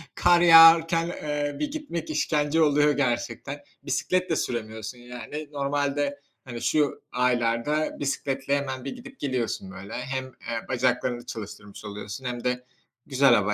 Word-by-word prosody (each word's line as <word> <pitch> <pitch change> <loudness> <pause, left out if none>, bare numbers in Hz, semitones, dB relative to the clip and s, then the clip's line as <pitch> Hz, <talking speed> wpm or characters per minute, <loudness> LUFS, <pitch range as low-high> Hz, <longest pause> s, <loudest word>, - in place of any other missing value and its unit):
kar 175 -1 +5
yağarken, 165 0 +8
eee, 145 -3 -3
bir 295 -1 -2
gitmek 285 - -5
işkence 150 +1 +1
oluyor 150 -1 +4
gerçekten. 135 0 -2 0.2
Bisiklet 180 +7 0
de 165 - +2
süremiyorsun 110 -1 -4
yani. 125 +5 -7
Normalde, 145 0 -1 0.3
hani, 120 -2 -7
şu 150 -2 +1
aylarda 125 +4 0
bisikletle 140 0 -1
hemen 135 -2 -4
bir - - -4
gidip 270 +2 -12
geliyorsun 125 -8 -2
böyle. 95 +1 -9
Hem, 130 +1 -3
eee, 115 -3 -6
bacaklarını 125 -1 0
çalıştırmış 105 -1 -8
oluyorsun 105 +4 -7
hem 120 -1 -4
de 125 0 -1 0.4
güzel 135 -2 +4
hava 105 -1 +3
135 Hz, 135 wpm, -26 LUFS, 120-150 Hz, 0.4 s, yağarken